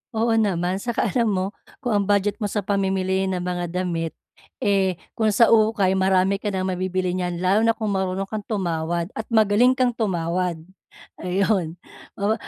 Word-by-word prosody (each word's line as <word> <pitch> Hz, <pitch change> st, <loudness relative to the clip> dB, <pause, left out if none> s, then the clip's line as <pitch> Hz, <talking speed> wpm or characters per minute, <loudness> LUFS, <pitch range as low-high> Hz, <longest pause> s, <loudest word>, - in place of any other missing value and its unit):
Oo 225 Hz, +1 st, +2 dB
naman. 190 Hz, -4 st, +1 dB
'Tsaka 235 Hz, 0 st, -1 dB
alam 235 Hz, -3 st, +2 dB
mo, 190 Hz, -2 st, 0 dB, 0.4 s
kung 240 Hz, -, +1 dB
ang -, -, -2 dB
budget 205 Hz, 0 st, +2 dB
mo 205 Hz, -, -1 dB
sa 205 Hz, -1 st, -2 dB
pamimili 190 Hz, -1 st, 0 dB
ng 185 Hz, -, -1 dB
mga 175 Hz, -1 st, -3 dB
damit, 170 Hz, -2 st, -3 dB, 0.4 s
eh, 190 Hz, -3 st, +1 dB, 0.2 s
kung 220 Hz, -1 st, +1 dB
sa 230 Hz, +3 st, +5 dB
ukay 215 Hz, -4 st, +3 dB
marami 190 Hz, +1 st, +2 dB
ka 210 Hz, -, -1 dB
nang 190 Hz, -2 st, -2 dB
mabibili 185 Hz, 0 st, -1 dB
niyan, 180 Hz, -1 st, -2 dB
lalo 185 Hz, +4 st, +2 dB
na 230 Hz, 0 st, +2 dB
kung 215 Hz, -2 st, -1 dB
marunong 190 Hz, 0 st, -1 dB
kang 215 Hz, +2 st, -5 dB
tumawad 170 Hz, -3 st, -2 dB
at 220 Hz, -, -5 dB
magaling 225 Hz, +3 st, +4 dB
kang 250 Hz, -2 st, +2 dB
tumawad. 180 Hz, -5 st, -1 dB, 0.6 s
Ayon. 185 Hz, -2 st, 0 dB, 0.4 s
Oo 205 Hz, +2 st, +1 dB
190 Hz, 170 wpm, -23 LUFS, 180-215 Hz, 0.6 s, sa